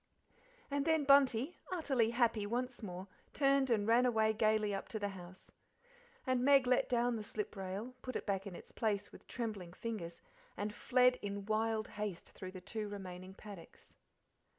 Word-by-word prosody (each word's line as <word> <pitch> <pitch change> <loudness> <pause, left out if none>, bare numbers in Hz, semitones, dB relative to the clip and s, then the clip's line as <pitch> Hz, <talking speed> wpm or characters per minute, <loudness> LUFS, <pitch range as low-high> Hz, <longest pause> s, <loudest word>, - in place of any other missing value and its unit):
And 285 0 +1
then 320 0 +3
Bunty, 275 +1 +4
utterly 270 -10 +2
happy 230 -3 +2
once 245 +3 -2
more, 185 -2 -6 0.3
turned 275 -1 +3
and 215 -3 +2
ran 235 +2 +5
away 220 -2 +3
gaily 215 -1 +2
up 195 - -3
to 220 - -4
the 205 -1 -1
house. 185 -1 -11 0.7
And 255 -2 +1
Meg 275 -1 +6
let 250 0 +3
down 240 -1 +2
the 215 - -5
slip 210 0 -4
rail, 195 +6 -5
put 255 - -6
it - - -3
back 195 -1 -1
in 185 - -7
its - - -12
place 205 -3 -1
with - - -15
trembling 210 -8 -4
fingers, 180 -7 -5 0.4
and 210 +1 -2
fled 250 +2 +3
in 200 -1 -4
wild 220 0 0
haste 210 -4 -5
through 185 -1 -8
the 185 - -7
two 210 +2 -4
remaining 190 -2 -7
paddocks. 200 -6 -12
220 Hz, 175 wpm, -36 LUFS, 200-250 Hz, 0.7 s, Meg